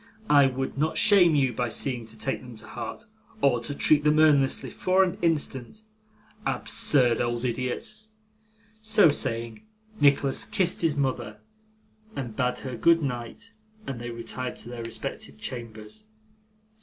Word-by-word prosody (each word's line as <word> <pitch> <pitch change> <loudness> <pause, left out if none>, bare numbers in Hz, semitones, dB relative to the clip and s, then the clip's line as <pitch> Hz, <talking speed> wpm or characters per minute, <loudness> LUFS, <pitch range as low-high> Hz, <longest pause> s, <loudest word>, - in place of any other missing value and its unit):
I 140 -2 +7
would 135 +1 -4
not 155 +1 0
shame 185 -7 +6
you 135 -3 +2
by 120 -1 -2
seeming 120 -2 -1
to 110 0 -12
take 135 +5 -3
them 125 -2 -11
to 110 0 -10
heart, 115 - -7 0.3
or 125 - +2
treat 145 +3 +2
them 150 0 +3
earnestly 145 -4 +3
for 185 +1 +2
an 190 +1 -2
instant. 160 - -1 0.6
Absurd 135 - +1
old 120 0 -2
idiot!' 125 - -3 0.9
So 215 -5 +5
saying, 115 -5 -2 0.4
Nicholas 140 +3 +3
kissed 200 -4 +1
his 160 -3 +1
mother, 125 -6 -2 0.8
and 120 -5 -5
bade 125 -2 0
her 130 -2 -4
good 165 +8 +3
night, 125 - -5 0.3
and 130 -8 -5
they 120 - -5
retired 120 +2 -5
to 120 - -8
their 120 -1 -6
respective 110 -10 -6
chambers. 115 - -8
130 Hz, 145 wpm, -26 LUFS, 120-155 Hz, 0.9 s, I